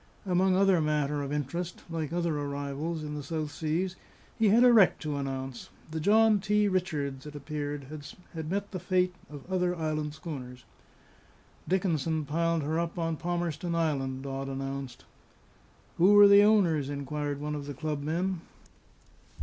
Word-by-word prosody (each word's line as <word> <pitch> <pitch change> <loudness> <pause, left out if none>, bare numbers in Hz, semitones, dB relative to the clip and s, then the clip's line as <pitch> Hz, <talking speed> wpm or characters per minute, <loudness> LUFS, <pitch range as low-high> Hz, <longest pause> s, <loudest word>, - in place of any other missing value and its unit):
Among 185 0 +3
other 190 -3 +4
matter 150 -1 0
of 140 0 -4
interest, 165 +5 -3
like 165 -3 -3
other 170 -3 0
arrivals 145 +3 -3
in 150 0 -5
the 150 - -4
South 155 +1 -3
Seas, 165 +5 -2 0.4
he 220 -2 +5
had 230 +4 +6
a 250 -1 +7
wreck 210 -6 +6
to 150 -2 -3
announce. 135 -2 -5 0.2
The 160 - -3
John 215 +4 +5
T. 210 +1 +2
Richards, 150 -8 -2
it 150 - -9
appeared, 145 -1 -4 0.5
had 160 -2 -5
met 200 +2 -2
the 185 - -4
fate 180 0 +1 0.2
of 145 -2 -9
other 180 -1 0
island 155 -2 -2
schooners. 125 -7 -8 1.0
"Dickinson 165 -4 0
piled 165 +2 0
her 160 +3 0
up 170 0 -3
on 165 -1 -1
Palmerston 170 0 -2
Island," 135 -5 -1
Dodd 135 0 -4
announced. 135 -1 -5 0.9
"Who 185 +4 +6
were 205 0 +10
the 200 0 +8
owners?" 180 -10 +3
inquired 145 0 -3
one 150 +1 -3
of 145 -1 -5
the 145 - -5
club 150 +1 -3
men. 170 +4 -1
155 Hz, 160 wpm, -29 LUFS, 145-180 Hz, 1.0 s, were